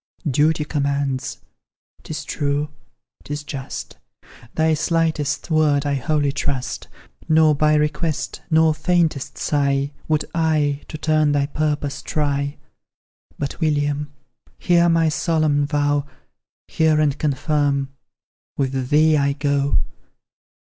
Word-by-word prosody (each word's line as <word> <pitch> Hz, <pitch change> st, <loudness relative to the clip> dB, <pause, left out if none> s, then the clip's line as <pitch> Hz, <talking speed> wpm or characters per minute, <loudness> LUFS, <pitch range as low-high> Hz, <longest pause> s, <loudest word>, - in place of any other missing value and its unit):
"Duty 150 Hz, +2 st, +2 dB
commands!" 140 Hz, -3 st, -2 dB, 0.6 s
'Tis -, -, -6 dB
true 145 Hz, +1 st, -1 dB, 0.5 s
'tis 145 Hz, 0 st, -5 dB
just; 135 Hz, -2 st, -7 dB, 0.6 s
Thy 160 Hz, 0 st, +3 dB
slightest 160 Hz, -1 st, 0 dB
word 150 Hz, -2 st, +3 dB
I 145 Hz, -, 0 dB
wholly 145 Hz, +1 st, +1 dB
trust, 135 Hz, -2 st, -3 dB, 0.4 s
Nor 155 Hz, -1 st, +5 dB
by 150 Hz, +1 st, +3 dB
request, 150 Hz, +1 st, -1 dB
nor 160 Hz, -1 st, +4 dB
faintest 160 Hz, -3 st, 0 dB
sigh, 140 Hz, -1 st, 0 dB, 0.2 s
Would 155 Hz, -1 st, +1 dB
I 155 Hz, -3 st, +1 dB
to -, -, -6 dB
turn 155 Hz, -1 st, +2 dB
thy 140 Hz, -1 st, +2 dB
purpose 145 Hz, -1 st, -2 dB
try; 140 Hz, -1 st, -1 dB, 0.8 s
But, 140 Hz, +2 st, -4 dB
William, 145 Hz, -1 st, 0 dB, 0.5 s
hear 175 Hz, -1 st, +3 dB
my 165 Hz, -1 st, +3 dB
solemn 155 Hz, -3 st, +1 dB
vow 145 Hz, -1 st, +1 dB, 0.6 s
Hear 160 Hz, -1 st, +2 dB
and 150 Hz, -3 st, +2 dB
confirm! 145 Hz, -1 st, 0 dB, 0.7 s
with 130 Hz, -2 st, -1 dB
thee 155 Hz, +1 st, +5 dB
I 140 Hz, -1 st, +2 dB
go. 140 Hz, -1 st, +1 dB
150 Hz, 110 wpm, -21 LUFS, 140-155 Hz, 0.8 s, Nor